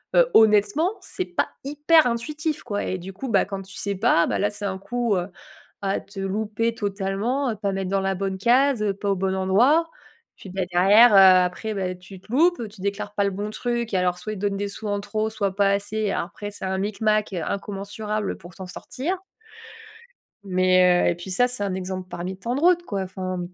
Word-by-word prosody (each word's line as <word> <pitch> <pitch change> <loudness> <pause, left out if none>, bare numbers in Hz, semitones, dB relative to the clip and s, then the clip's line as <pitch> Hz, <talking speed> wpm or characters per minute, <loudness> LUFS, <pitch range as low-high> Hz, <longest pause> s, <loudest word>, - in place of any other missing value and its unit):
Heu, - - +5
honnêtement, 220 - +4
c'est 370 - -4
pas 355 - -1
hyper 295 +3 +4
intuitif, 300 +6 -2
quoi, 205 -4 -3
et 185 - -3
du 190 +2 -8
coup, 255 +7 -6
bah, 200 -4 +3
quand 195 -1 -6
tu 195 +1 -13
sais 200 0 -2
pas, 170 -2 +3
bah - - 0
là, 205 +1 0
c'est 205 0 -6
un 190 -1 -2
coup, 225 +3 -1
heu, 180 -1 -1 0.5
à 195 -1 0
te 195 0 -11
louper 215 +4 -1
totalement, 205 +6 -1
à 225 - -1
pas 200 -1 -2
mettre 190 -1 -3
dans 195 0 +1
la 195 0 0
bonne 190 0 -3
case, 250 +4 +3
heu, 205 -2 +1
pas 200 +1 -4
au 195 - +2
bon 190 0 -1
endroit. 240 - +3 0.5
Puis, 195 - -11
bah, 190 +1 -3
derrière, 205 +6 +6
heu, - - +7
après, 185 +2 +5
bah, 185 -2 -2
tu 180 +1 -13
te 215 - -16
loupes, 310 -3 +2
tu 205 0 -17
déclares 200 +1 -3
pas 200 - +2
le 200 - +1
bon 205 +2 -4
truc 235 +1 -3
et - - +3
alors 180 -1 0
soit 215 - -5
il - - -5
te - - -9
donne 200 - -2
des 205 +1 -2
sous 215 +2 -7
en 205 0 -1
trop, 215 +1 -2
soit 200 -3 -2
pas 200 0 +3
assez. 205 +1 -1
Alors, - - -1
après, 205 +2 -8
c'est 200 - -6
un 190 0 -1
micmac 215 +1 0
incommensurable 200 +3 -3
pour 175 +1 -13
t'en 190 0 -8
sortir 275 - -4 1.3
mais 185 -1 +3
heu, - - +5
et 175 - 0
puis 175 +2 -8
ça, 245 +7 +3
c'est 245 -4 -2
un 195 -2 -2
exemple 185 0 -5
parmi 180 +2 -5
tant 235 +6 -3
de 280 - -2
route, 350 +1 +4
quoi, 200 - -3
enfin. 185 -1 -4
200 Hz, 225 wpm, -24 LUFS, 190-225 Hz, 1.3 s, heu